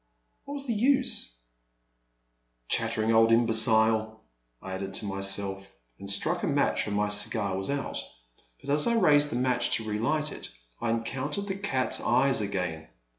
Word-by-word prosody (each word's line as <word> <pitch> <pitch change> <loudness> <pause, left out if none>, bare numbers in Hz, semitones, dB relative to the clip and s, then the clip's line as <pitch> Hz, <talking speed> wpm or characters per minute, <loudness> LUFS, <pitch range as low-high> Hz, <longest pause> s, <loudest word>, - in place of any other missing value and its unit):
What 285 - -6
was 280 -1 -5
the 240 - -1
use? 255 - +1 0.6
'* - - -48
Chattering 110 +1 +1
old 115 0 +5
imbecile,*' 110 -1 +3 0.4
I 95 - -9
added 95 0 -5
to 105 - -1
my 100 -1 -4
self, 95 0 -2 0.3
and 100 - -8
struck 100 - +1
a - - -1
match, - - +1
for - - -5
my 105 0 0
cigar 105 -1 0
was 95 0 -3
out; 140 0 -3 0.6
but 140 - -5
as 150 +6 +3
I 235 - +2
raised 145 -9 +4
the - - -4
match 125 0 +1
to 110 - -4
relight 140 +9 0
it, - - -8 0.3
I 115 - 0
encotm 130 +5 -3
tered 200 0 -4
the 190 - -3
cat's 190 -10 -1
eyes 130 0 +3
again. 90 -7 -3
110 Hz, 175 wpm, -27 LUFS, 100-140 Hz, 0.6 s, old